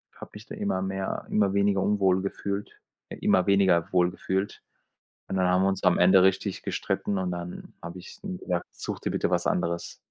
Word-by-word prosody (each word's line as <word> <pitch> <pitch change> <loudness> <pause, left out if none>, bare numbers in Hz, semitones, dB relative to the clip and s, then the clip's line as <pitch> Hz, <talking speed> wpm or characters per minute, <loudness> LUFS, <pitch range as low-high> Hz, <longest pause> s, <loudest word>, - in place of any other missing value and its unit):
habe - - -11
mich - - -11
da - - -7
immer 95 - -1
mehr 95 0 -3
immer 100 -2 +2
weniger 100 -1 +2
unwohl 95 -3 +2
gefühlt 100 +1 -4 0.3
äh, - - -7
immer 90 - +3
weniger 95 -4 +3
wohl 90 -1 +4
gefühlt 95 +1 -3 0.7
und 95 - -2
dann 90 -1 +2
haben 90 +1 +3
wir 95 - +3
uns 95 0 -2
am 90 - +4
Ende 95 +1 +6
richtig 95 0 +1
gestritten 100 -2 -2
und 90 -1 -1
dann 85 0 -7
habe 85 +2 -7
ich 90 - -11
zu 200 - -10
ihm 185 -1 -4
gesagt: 90 - -2
„Such - - -6
dir - - -2
bitte - - 0
was - - +1
anderes.“ 85 0 -1
95 Hz, 210 wpm, -27 LUFS, 90-100 Hz, 0.7 s, Ende